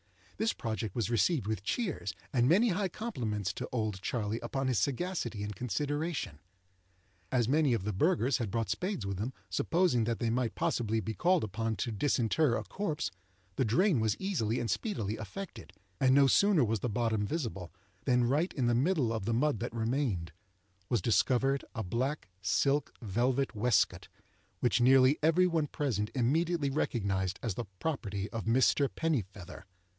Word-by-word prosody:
This 225 +1 +1
project 110 -3 -4
was 115 -1 -1
received 125 - +2
with 110 -2 -2
cheers, 175 - -2 0.2
and 125 -1 +3
many 210 +8 +5
high 195 +1 0
compliments 115 - -3
to 125 - -5
"Old 110 -6 -2
Charley" 110 0 -2
upon 135 +3 -2
his 125 -6 +2
sagacity 130 - -2
and 105 0 -5
consideration. 145 - -2 0.9
As 120 -3 +2
many 145 -2 +3
of 105 - -3
the 105 +1 -2
burghers 135 - +2
had 115 -4 -2
brought 115 +1 -1
spades 185 - -2
with 100 -1 -3
them, 115 +7 -3 0.2
supposing 155 - +2
that 115 0 -1
they 115 -2 -1
might 120 -4 -1
possibly 110 -2 0
be 110 +1 -3
called 180 +6 +2
upon 110 +2 -2
to 115 - -2
disinter 120 +3 +1
a - - -4
corpse, 155 - -3 0.5
the - - +3
drain 155 - +3
was 110 -2 +1
easily 125 - -1
and 120 -1 -1
speedily 145 - -2
effected; 110 - -8 0.3
and 130 0 +4
no 140 0 +6
sooner 190 +2 +4
was 110 -1 0
the 120 - -2
bottom 110 -1 0
visible, 105 - -3 0.3
than 125 -1 +3
right 145 +9 +1
in 130 - 0
the 120 - +3
middle 135 -2 +2
of 110 -4 -3
the 115 +1 0
mud 145 -2 +1
that 115 - -4
remained 115 - -1 0.6
was 115 -7 +1
discovered 135 +4 +2
a 110 - -2
black 130 +10 -2
silk 140 +10 +1
velvet 125 +6 0
waistcoat, 110 -1 +2 0.5
which 120 -1 +2
nearly 130 +3 +5
every 165 +4 +4
one 165 -4 +1
present 120 - -1
immediately 150 +4 +1
recognized 100 -9 -1
as 115 -5 -1
the 120 - -4
property 100 -11 -2
of 115 -2 -4
Mr. 130 +4 +3
Pennifeather. 100 - -3
120 Hz, 170 wpm, -31 LUFS, 110-150 Hz, 0.9 s, no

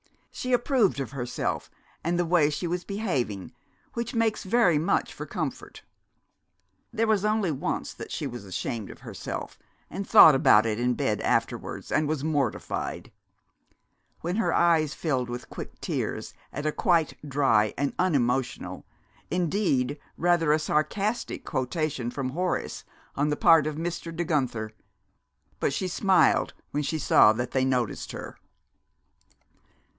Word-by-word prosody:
She 255 - -4
approved 240 - +2
of 135 - -4
herself 125 -3 -3 0.3
and 170 +2 0
the 175 - +1
way 165 -3 +3
she 150 +4 -3
was 175 +1 -2
behaving, 135 - -2 0.4
which 235 +2 -4
makes 225 -1 +1
very 195 -6 +3
much 160 - 0
for - - -7
comfort. - - -5 1.1
There 225 -1 +1
was 215 -3 +2
only 210 -4 +1
once 135 - -3
that - - -9
she - - -3
was 120 -4 -6
ashamed 100 +3 -4
of - - -12
herself, - - -6 0.3
and 195 - -5
thought 185 -8 +9
about 110 -5 +5
it 110 0 -1
in 125 0 +1
bed - - 0
afterwards - - -1
and 155 -1 +2
was 150 -2 -2
mortified; 145 -7 -2 1.1
when 175 +4 -2
her 225 - +1
eyes 160 -4 +3
filled 130 -6 -1
with 120 0 -7
quick - - -8
tears - - -3 0.2
at 145 - -5
a 155 - +2
quite 170 -4 +2
dry 130 -7 +3
and 140 0 0
unemotional 135 -8 0 0.4
indeed, 165 -7 0 0.2
rather 170 -3 +3
a 155 - +5
sarcastic 195 +9 -1
quotation 130 -1 -2
from 130 +1 -3
Horace 180 +6 -2 0.3
on 145 +2 +1
the 150 - 0
part 160 -3 +5
of 155 - -3
Mr. 165 0 -4
De 175 - -1
Guenther. 125 -10 -1 0.9
But - - 0
she 185 - -1
smiled, 190 +1 +3 0.2
when 150 - -1
she 155 +2 -1
saw 110 -6 +6
that 120 +2 -3
they 130 -1 +1
noticed 125 -4 -1
her. - - -8
155 Hz, 145 wpm, -27 LUFS, 130-180 Hz, 1.1 s, thought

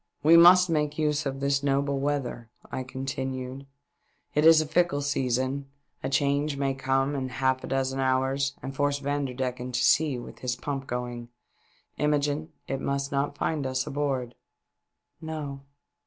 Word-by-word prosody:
" - - -44
We 160 +3 +7
must 180 +2 +8
make 150 -3 0
use 150 -2 0
of 135 0 -4
this 140 0 +1
noble 140 0 +1
weather," 135 -5 -2 0.2
I - - -3
continued; 130 0 -5 0.3
" - - -44
it 150 +2 +4
is 165 -1 +8
a 155 - +1
fickle 155 -2 +1
season, 135 0 -1 0.3
a 135 - -2
change 140 +1 +1
may 135 -1 0
come 135 +1 0
in 130 -2 -2
half 130 0 0
a - - -5
dozen 135 0 -1
hours 135 +1 +1
and 135 0 -5
force 145 0 +1
Vanderdecken 130 -3 -3
to 120 - +1
sea 150 -4 +3
with 120 - -9
his 125 -1 -2
pump 135 +1 -4
going. 120 -1 -4 0.7
Imogene, 150 +1 0 0.2
it 135 0 -3
must 140 0 -2
not 140 +1 -1
find 150 -4 -1
us 130 0 -1
aboard." 135 -4 -2 0.5
" - - -56
No." 150 -4 -5
140 Hz, 165 wpm, -27 LUFS, 130-145 Hz, 0.7 s, must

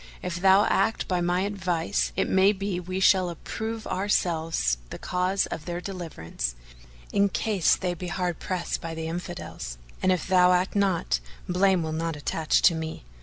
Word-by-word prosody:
If 180 -1 -3
thou 195 +2 +6
act 220 +3 +1
by 180 -2 0
my 175 +1 +1
advice, 175 - -1
it - - +1
may 190 +2 +4
be 195 -2 -3
we 185 +1 -4
shall 185 -1 +4
approve 220 +6 -5
ourselves 165 - 0
the - - -6
cause 185 +2 0
of 155 - -6
their 175 0 -3
deliverance, 160 - -5 0.6
in 200 0 +4
case 200 -4 +2
they 180 -2 -2
be 180 +1 -6
hard 180 -1 -2
pressed 180 -2 -3
by 165 -1 -5
the 160 0 -4
Infidels; 170 - -6 0.2
and 185 - +3
if 180 -4 0
thou 180 -1 +5
act 180 +3 +1
not, 185 - +1 0.3
blame 185 -1 +3
will 160 - -3
not 165 0 -2
attach 155 +2 0
to 175 - +7
me. 160 - -5
180 Hz, 170 wpm, -26 LUFS, 165-190 Hz, 0.6 s, to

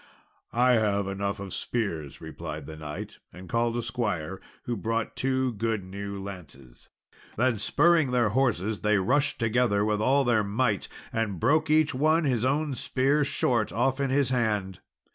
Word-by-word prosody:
"I 125 +2 +3
have 105 -4 +2
enough 100 +1 -3
of 100 -1 -6
spears," 85 - -3
replied 80 -2 -7
the 80 - -8
knight, 75 -1 -7
and 90 +1 -11
called 115 +2 0
a 120 - -2
squire, 95 -8 -3 0.2
who 120 - -2
brought 115 +1 -2
two 130 -1 0
good 110 -1 -1
new 100 +1 -6
lances. 80 -11 -10 0.5
Then 120 -1 +2
spurring 160 +6 +3
their 120 -3 +2
horses, 110 -4 0
they 105 0 +2
rushed 135 +10 +1
together 115 -3 +2
with 105 -1 0
all 135 +5 +3
their 115 -4 +2
might, 105 0 0 0.3
and 105 -5 -1
broke 155 - +2
each 155 -1 +3
one 155 +5 +2
his 125 -6 +1
own 145 +3 +1
spear 135 +3 +1
short 120 -6 0
off 130 +6 0
in 140 -1 0
his 135 0 +2
hand. 105 -7 0
115 Hz, 160 wpm, -27 LUFS, 100-130 Hz, 0.5 s, I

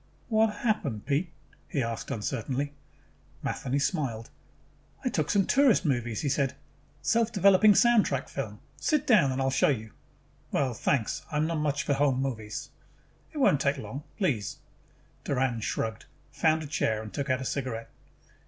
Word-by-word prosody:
"What 220 0 +4 0.2
happened, 140 - 0
Pete?" 155 +4 0 0.4
he 135 - -1
asked 115 0 -4
uncertainly. 135 +5 -2 0.7
Matheny 135 +1 -1
smiled. 135 - -1 0.7
"I - - +3
took 155 - -1
some 195 -2 +3
tourist 255 -8 +4
movies," 120 -6 0
he 150 - -1
said. 135 -1 0 0.5
"Self 230 +8 +2
developing 200 0 +6
soundtrack 215 - +3
film. 105 -6 -5 0.2
Sit 300 - +1
down 185 - +5
and 130 - -2
I'll 135 0 +1
show 130 - +3
you." 110 -6 -2 0.6
"Well, 135 -3 +1
thanks, 120 0 0
but - - -6
I - - +2
am 150 - +2
not 165 - -1
so - - -1
much 150 -1 0
for 145 - +1
home 135 -2 +2
movies." 110 -6 -4 0.6
"It 310 - -9
won't 150 - +4
take 140 0 +1
long. 140 - -6 0.2
Please." 120 - -1 0.7
Doran 130 -3 0
shrugged, 110 0 -3 0.3
found 155 +3 +2
a - - -6
chair 110 -7 0
and 110 - -9
took 140 0 -3
out 130 0 +2
a - - -4
cigarette. 125 -4 -3
140 Hz, 165 wpm, -28 LUFS, 125-165 Hz, 0.7 s, developing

